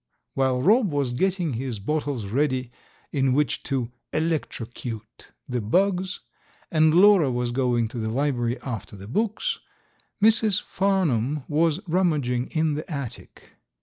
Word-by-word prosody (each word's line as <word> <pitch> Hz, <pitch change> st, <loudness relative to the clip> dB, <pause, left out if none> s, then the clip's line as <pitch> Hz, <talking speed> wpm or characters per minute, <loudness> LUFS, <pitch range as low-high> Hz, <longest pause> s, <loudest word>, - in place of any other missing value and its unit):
While 130 Hz, -1 st, +1 dB
Rob 215 Hz, -, +4 dB
was 140 Hz, -4 st, 0 dB
getting 180 Hz, +1 st, 0 dB
his 120 Hz, -1 st, -3 dB
bottles 140 Hz, +1 st, -2 dB
ready 130 Hz, +2 st, 0 dB, 0.4 s
in 135 Hz, -2 st, +2 dB
which 145 Hz, -1 st, +1 dB
to 130 Hz, -3 st, -1 dB, 0.2 s
"electrocute" 120 Hz, -8 st, -4 dB, 0.2 s
the 125 Hz, -2 st, -2 dB
bugs 185 Hz, -, +1 dB, 0.5 s
and 155 Hz, 0 st, +4 dB
Lora 185 Hz, -6 st, +6 dB
was 120 Hz, 0 st, -1 dB
going 120 Hz, -2 st, +1 dB
to 120 Hz, 0 st, -6 dB
the 110 Hz, 0 st, -2 dB
library 120 Hz, -1 st, 0 dB
after 115 Hz, -5 st, -5 dB
the 100 Hz, 0 st, -10 dB
books, 215 Hz, -, -1 dB, 0.6 s
Mrs. 215 Hz, -1 st, +4 dB
Farnum 155 Hz, -, 0 dB
was 160 Hz, +3 st, +1 dB
rummaging 150 Hz, -9 st, +1 dB
in 155 Hz, -1 st, 0 dB
the 155 Hz, +3 st, -5 dB
attic. 140 Hz, -6 st, -7 dB
140 Hz, 130 wpm, -25 LUFS, 120-170 Hz, 0.6 s, Lora